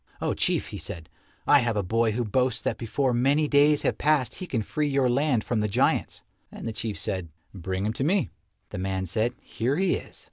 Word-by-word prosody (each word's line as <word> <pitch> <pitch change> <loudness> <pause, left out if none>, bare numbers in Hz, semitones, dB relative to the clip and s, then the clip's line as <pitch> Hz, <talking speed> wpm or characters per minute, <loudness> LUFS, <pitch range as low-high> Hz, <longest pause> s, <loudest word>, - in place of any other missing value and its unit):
"Oh, - - 0
Chief," - - 0
he - - -6
said, 80 -2 -7 0.4
"I 145 - +6
have 120 -4 0
a 100 - +1
boy 115 +3 +1
who 120 +2 -1
boasts 125 +3 +1
that - - -2
before 125 +3 0
many 140 +5 +2
days 145 +1 +4
have - - 0
passed 150 -4 +2
he 185 - -6
can 115 -8 -1
free 150 +8 -1
your 135 -2 +2
land 125 -2 +2
from 120 - -1
the 105 - +1
giants." 100 - 0 0.3
And - - -9
the 115 - -3
Chief 110 -1 -4
said, 95 -4 -3 0.2
"Bring 95 +1 -3
him 110 - 0
to 130 - -2
me." 180 +6 +1 0.4
The - - -6
man 95 0 -2
said, 110 +6 0
"Here 125 +5 -1
he 190 -1 +2
is." - - -12
120 Hz, 220 wpm, -26 LUFS, 105-140 Hz, 0.4 s, I